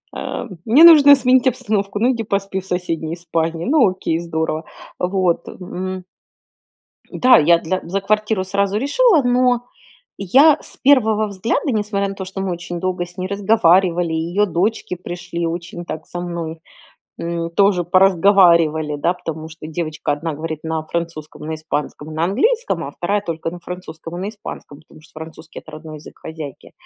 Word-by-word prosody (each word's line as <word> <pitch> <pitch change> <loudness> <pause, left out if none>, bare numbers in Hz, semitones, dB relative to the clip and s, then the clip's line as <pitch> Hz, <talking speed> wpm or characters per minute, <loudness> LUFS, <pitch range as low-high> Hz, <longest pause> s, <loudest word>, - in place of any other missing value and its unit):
э, - - -5 0.2
мне 255 +9 +6
нужно 295 -4 +9
сменить 255 -1 +3
обстановку. 205 -5 -1
Ну, 245 +3 +3
иди 230 -2 -3
поспи 195 -2 -2
в 190 - -10
соседней 170 -3 -3
спальне. 165 -1 -2
Ну, 275 -6 +4
окей, 185 -3 -2
здорово. 160 -1 -3 0.3
Вот. 180 -2 0
М. 185 0 -6 1.1
Да, 255 0 +5
я 170 +2 +4
для 185 +3 -2
за 195 +4 -3
квартиру 210 -1 0
сразу 200 +1 0
решила, 320 - +3
но 245 0 +2 0.5
я 275 - +5
с - - -9
первого 220 -6 +3
взгляда, 210 - -1
несмотря 205 -2 -1
на 195 - -6
то, 190 - -6
что 195 +1 -6
мы 190 -1 -2
очень 175 0 -5
долго 180 -1 -2
с 175 +1 -16
ней 185 - -3
разговаривали, 185 -4 +2
ее 170 +6 0
дочки 185 +2 -1
пришли, 175 -1 -5
очень 175 +1 -6
так 155 -1 -7
со 175 - -6
мной, 165 -2 -5 0.6
м, 170 0 -3
тоже 195 0 +3
поразговаривали, 170 -4 +4
да, 145 +5 0
потому 160 -3 -7
что 160 -1 -10
девочка 160 -2 -3
1 160 +2 -4
говорит 155 +1 -6
на 160 -1 -2
французском, 165 -2 -5
на 160 +1 -4
испанском, 155 0 -5
на 160 +1 -1
английском, 455 - 0
а - - -7
2- 200 +4 -1
только 165 0 -4
на 175 - -9
французском 175 -2 -8
и - - -5
на 200 - -3
испанском, 205 -8 -10
потому 155 - -18
что 160 - -21
французский- 160 0 -10
это 155 - -14
родной 155 0 -9
язык 150 - -14
хозяйки, 155 -4 -9
180 Hz, 170 wpm, -19 LUFS, 165-205 Hz, 1.1 s, нужно